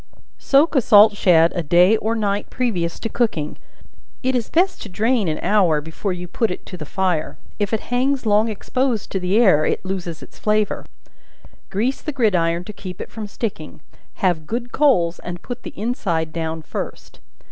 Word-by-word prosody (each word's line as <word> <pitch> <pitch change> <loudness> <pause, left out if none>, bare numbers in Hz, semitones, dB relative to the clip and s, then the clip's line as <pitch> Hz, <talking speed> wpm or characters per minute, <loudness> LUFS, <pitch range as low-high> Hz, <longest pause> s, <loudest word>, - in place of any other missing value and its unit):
Soak 290 +4 +3
a 270 - +4
salt 210 -1 +7
shad 170 -4 +4
a 175 - 0
day 175 +6 +5
or 220 +2 -1
night 205 -2 -1
previous 185 -10 -2
to - - -1
cooking, 215 -11 -1 0.6
it 260 +1 +1
is 235 -3 -1
best 360 +3 +1
to 210 - -7
drain 220 +2 +1
an 155 - -1
hour 185 -7 +3
before 160 +6 -4
you 180 0 -5
put 225 +6 0
it 180 - -6
to - - -8
the 155 -4 -8
fire; 180 -4 -1 0.2
if 205 -1 -1
it 220 - 0
hangs 260 +1 +1
long 215 +1 +3
exposed 240 +2 -2
to 190 - -1
the 185 +3 +1
air, 185 -10 +5
it - - -1
loses 180 -4 -4
its - - -15
flavor: 210 -1 0 0.8
grease 235 +7 -1
the 305 - -3
gridiron 180 - +1
to 210 - -9
keep 185 -3 -8
it - - -7
from 215 -1 -6
sticking; 200 -8 -5 0.4
have 175 -5 0
good 240 +1 -4
coals, 180 - +2
and 175 0 -7
put 245 0 -6
the - - -9
inside 175 -9 -1
down 160 -1 -3
first. - - -7
200 Hz, 185 wpm, -21 LUFS, 175-230 Hz, 0.8 s, salt